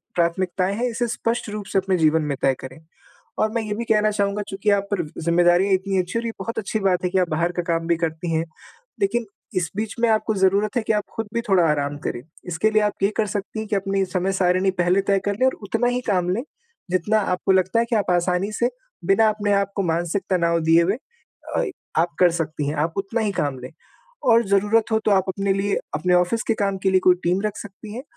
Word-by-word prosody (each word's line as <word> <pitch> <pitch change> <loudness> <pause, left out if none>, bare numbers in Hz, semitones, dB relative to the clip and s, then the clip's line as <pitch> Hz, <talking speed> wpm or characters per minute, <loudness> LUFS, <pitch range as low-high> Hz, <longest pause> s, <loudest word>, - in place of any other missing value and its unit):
प्राथमिकताएँ 180 +2 0
हैं 245 +3 -1
इसे 240 +1 -1
स्पष्ट 230 -1 -2
रूप 210 -1 -5
से 195 - +4
अपने 190 -1 0
जीवन 160 0 +3
में 135 - -2
तय 135 - +3
करें 130 +4 -9 0.6
और 215 - +2
मैं 230 0 -1
ये 210 -1 -3
भी 235 +2 -4
कहना 215 -1 +3
चाहूँगा, 200 0 0
चूँकि 195 +2 -1
आप 200 0 +1
पर 200 -3 +1
व 150 - -10
ज़िम्मेदारियाँ 175 +3 +3
इतनी 190 +1 0
अच्छी 185 +5 -2
हैं - - 0
और - - -2
ये 230 - -2
बहुत 230 - -5
अच्छी 215 +1 -2
बात 190 -2 +1
है - - +1
कि 190 - +1
आप 180 - +1
बाहर 165 +3 0
का 175 - -1
काम 165 0 0
भी 170 - +3
करती 165 0 -3
हैं, 160 +1 +1 0.6
लेकिन 240 - +1 0.3
इस 170 -3 0
बीच 215 0 -3
में 235 - +3
आपको 220 0 +1
ज़रूरत 200 +2 +2
है 240 - +2
कि 220 - +3
आप 210 - 0
ख़ुद 225 - -2
भी 235 - 0
थोड़ा 185 -2 +5
आराम 145 -1 -1
करें। 120 - -3 0.3
इसके 180 +6 +1
लिए 215 0 +3
आप 210 0 +1
ये 195 - +4
कर 215 - +1
सकती 205 +2 -4
हैं, 220 - -4
कि 210 - -1
अपनी 195 0 0
समय 185 +1 -1
सारिणी 185 0 +2
पहले 180 +1 +2
तय 195 -1 +4
कर 205 - +1
लें 255 - +4
और - - +1
उतना 225 +4 0
ही 245 0 0
काम 180 -2 +1
लें 195 +6 0 0.5
जितना 205 +4 +2
आपको 185 +1 0
लगता 190 +4 +3
है 235 - +2
कि 235 - +1
आप 200 -4 +1
आसानी 180 +3 +1
से 240 +3 +1 0.4
बिना 195 +4 +4
अपने 205 -1 0
आप 200 0 +1
को 195 - 0
मानसिक 170 +3 -1
तनाव 170 -2 +2
दिए 165 +1 +6
हुए 195 +7 0 0.6
अ - - +2 0.4
आप 170 0 -2
कर 180 -1 +6
सकती 155 -3 -3
हैं, 150 - -2
आप 160 +3 -1
उतना 215 +4 -1
ही 210 -2 0
काम 140 -3 -2
लें। 125 +3 -9 0.6
और 230 +1 +5
ज़रूरत 210 +3 +2
हो 220 - +3
तो 210 - +3
आप 190 -1 +3
अपने 195 +1 0
लिए 195 +1 0 0.2
अपने 180 +4 +1
ऑफ़िस 180 +6 +2
के 225 - +3
काम 195 -2 -1
के 190 - +3
लिए 185 - +4
कोई 180 - +7
टीम 180 +3 +1
रख 210 0 -2
सकती 205 +1 -9
हैं 255 - -6
195 Hz, 250 wpm, -22 LUFS, 175-215 Hz, 0.6 s, कोई